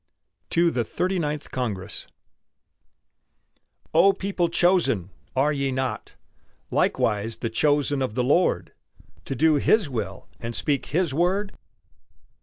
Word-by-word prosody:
TO 170 0 +3
THE 120 - 0
THIRTY 180 - -1
NINTH 150 -2 -3
CONGRESS 105 -6 -4 1.9
O 190 +5 +6
people 190 -3 -1
chosen! 170 - +2 0.2
are 145 +3 +2
ye 140 -1 -1
not 130 0 -3 0.6
Likewise 105 +2 0
the 115 - -3
chosen 145 +2 +2
of 125 -5 -2
the 125 - +1
Lord, 125 - +1 0.5
To 135 - -3
do 155 +3 +4
His 180 +1 +2
will 100 -6 -4
and 115 0 -5
speak 145 -3 0
His 165 -2 0
word? 190 +6 0
145 Hz, 120 wpm, -25 LUFS, 120-175 Hz, 1.9 s, O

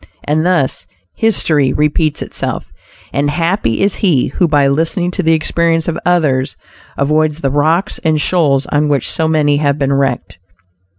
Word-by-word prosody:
And 155 +2 0
thus 140 - 0 0.3
"history 155 -11 +2
repeats 150 0 0
itself," - - -5 0.4
and 145 +1 0
happy 165 - 0
is 200 -1 +2
he 165 -11 +2
who 175 +6 0
by 145 -3 +3
listening 165 +5 0
to 190 - -2
the 165 -2 +2
experience 165 +1 0
of 170 - -1
others 145 -7 +1 0.4
avoids 155 +2 0
the 135 - 0
rocks 160 +8 0
and 155 -2 +1
shoals 145 -5 +1
on 150 +1 0
which 140 -4 0
so 160 - -1
many 150 -2 +2
have 145 -1 0
been 140 -1 0
wrecked. 135 -9 -2
155 Hz, 160 wpm, -14 LUFS, 140-165 Hz, 0.4 s, by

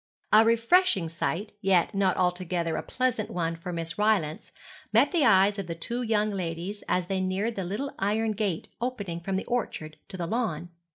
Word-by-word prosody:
A 215 +1 +8
refreshing 230 - +3
sight, 185 +5 -3
yet 190 -1 +3
not 195 -2 +2
altogether 180 -2 0
a - - -1
pleasant 255 -4 -1
one 165 -1 -2
for 170 +2 -7
Miss 165 +1 -5
Rylance, 205 -4 +1 0.4
met - - +4
the 340 -5 +2
eyes 200 -3 +5
of 195 - -4
the 170 - -4
two 235 +9 -3
young 215 -2 +1
ladies 185 +2 -4
as 180 -1 +1
they 190 +1 -1
neared 190 +5 -1
the 195 - -2
little 210 +11 -3
iron 215 +3 +1
gate 205 -5 -2
opening 205 -9 -3
from 190 +3 -3
the 190 - -2
orchard 155 -10 -3
to 185 - -8
the 175 - -2
lawn. 175 -6 -2
195 Hz, 185 wpm, -27 LUFS, 170-220 Hz, 0.4 s, A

